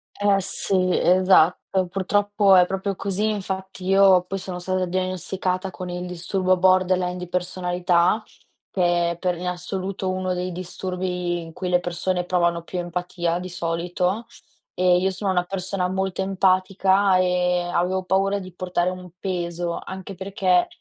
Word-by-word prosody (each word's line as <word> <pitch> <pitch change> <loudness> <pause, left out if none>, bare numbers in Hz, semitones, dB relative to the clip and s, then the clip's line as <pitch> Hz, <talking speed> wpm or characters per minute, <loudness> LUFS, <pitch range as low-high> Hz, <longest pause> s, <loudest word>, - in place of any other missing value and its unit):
Eh, 205 -1 +3
sì, 185 -1 +2
esatto, 185 0 +3
purtroppo 205 +1 +2
è 180 -1 +7
proprio 195 +1 -3
così. 200 +3 0
Infatti 190 -2 -5
io 190 -1 +5
poi 195 +1 -4
sono 185 -1 -6
stata 185 +1 -1
diagnosticata 185 +1 -2
con 185 -1 -7
il 180 0 -4
disturbo 185 +1 0
borderline 185 -1 +2
di 180 - -6
personalità, 180 +2 +1 0.5
che 175 -2 +1
è 170 - -6
per 180 -1 -1
in 180 - -5
assoluto 185 +2 -3
uno 185 0 -1
dei 180 0 -3
disturbi 180 0 -3
in 165 -1 -10
cui 180 +1 -4
le 180 0 +3
persone 180 +1 -2
provano 170 -2 +1
più 180 +1 -5
empatia 175 0 -2
di 185 +1 -6
solito 180 +4 -2 0.5
e 180 -1 +3
io 190 +2 +1
sono 190 +1 -2
una 180 -1 +1
persona 185 0 -2
molto 190 0 -2
empatica 190 0 +2
e 180 -1 +2
avevo 180 +2 -1
paura 195 +2 +1
di 185 -2 -10
portare 180 -1 -1
un 185 0 -8
peso, 175 -2 -3
anche 190 +1 -7
perché 190 -1 +1
185 Hz, 150 wpm, -23 LUFS, 180-190 Hz, 0.5 s, è